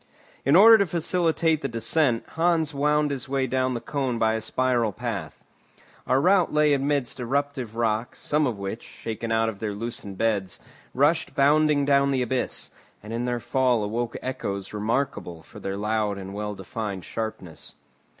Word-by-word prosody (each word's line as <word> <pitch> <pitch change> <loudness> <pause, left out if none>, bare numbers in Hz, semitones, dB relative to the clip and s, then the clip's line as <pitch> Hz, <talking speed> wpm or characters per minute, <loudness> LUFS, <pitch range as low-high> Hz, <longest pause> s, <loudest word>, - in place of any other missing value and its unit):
In 140 +4 +4
order 220 +4 +9
to 200 - +2
facilitate 165 -1 +1
the 140 - -1
descent, 120 +1 0
Hans 165 -1 +1
wound 150 +1 +1
his 130 -2 -5
way 135 -1 +1
down 130 0 0
the - - -2
cone 130 -2 -2
by 110 -1 +2
a 110 - -2
spiral 120 -1 +1
path. - - -5 0.6
Our 130 - +3
route 185 +3 +3
lay 150 -1 +3
amidst 140 -2 0
eruptive 130 -2 -2
rocks, 115 0 -1
some 150 0 +1
of 115 -5 -3
which, 100 +3 -5
shaken 115 0 -6
out 115 0 +2
of 105 -3 -4
their 110 -2 -3
loosened 115 -2 -6
beds, 100 -4 -1 0.4
rushed 150 +5 +2
bounding 145 0 +4
down 140 0 +3
the 130 -2 +1
abyss, 130 0 -1 0.3
and 105 +2 -7
in 120 +1 -2
their 120 -1 -1
fall 120 -1 +1
awoke 115 +3 -2
echoes 100 -7 -4
remarkable 105 -6 -2
for - - -13
their 95 0 -4
loud 105 -1 -1
and 95 0 -7
well 105 0 -4
defined 100 0 -5
sharpness. 110 -7 -6
125 Hz, 170 wpm, -25 LUFS, 110-145 Hz, 0.6 s, order